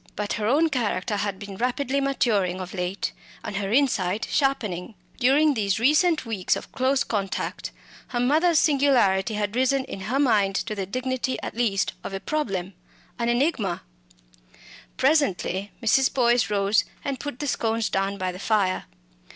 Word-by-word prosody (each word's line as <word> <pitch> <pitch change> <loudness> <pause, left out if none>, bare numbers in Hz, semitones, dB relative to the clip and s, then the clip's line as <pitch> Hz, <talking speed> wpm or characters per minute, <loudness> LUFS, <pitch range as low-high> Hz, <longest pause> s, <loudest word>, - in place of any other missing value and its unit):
But 210 -1 -2
her 215 -2 -2
own 305 +7 +3
character 220 -6 -1
had 200 -1 -2
been 200 -1 -8
rapidly 255 +3 0
maturing 210 -9 +1
of 185 -1 -7
late, 180 +1 -2 0.3
and 205 -2 -4
her 195 -1 -2
insight 220 -7 +1
sharpening. 220 - -1 0.2
During 290 +4 +4
these 205 -4 0
recent 305 +5 +3
weeks 210 -5 0
of - - -8
close 260 +1 +1
contact, 195 -3 -3 0.4
her 245 - -3
mother's 310 +7 +3
singularity 240 -9 +3
had 210 0 -2
risen 260 +1 +2
in 195 - -7
her 215 +8 -2
mind 210 -8 +3
to 220 - -2
the 195 -3 -4
dignity 255 +4 -2
at - - -4
least 215 -5 0
of 195 - -5
a - - -3
problem, 195 - -2 0.5
an 235 0 0
enigma. 240 - 0 1.1
Presently 205 - +1
Mrs. 260 +4 +3
Boyce 245 -2 +2
rose 200 0 +2 0.2
and 275 -2 -2
put 290 -4 -5
the 290 - -4
scones 225 -4 0
down 195 +1 -1
by 185 -1 -2
the 180 - -9
fire. 200 -3 +1
230 Hz, 160 wpm, -25 LUFS, 195-270 Hz, 1.1 s, During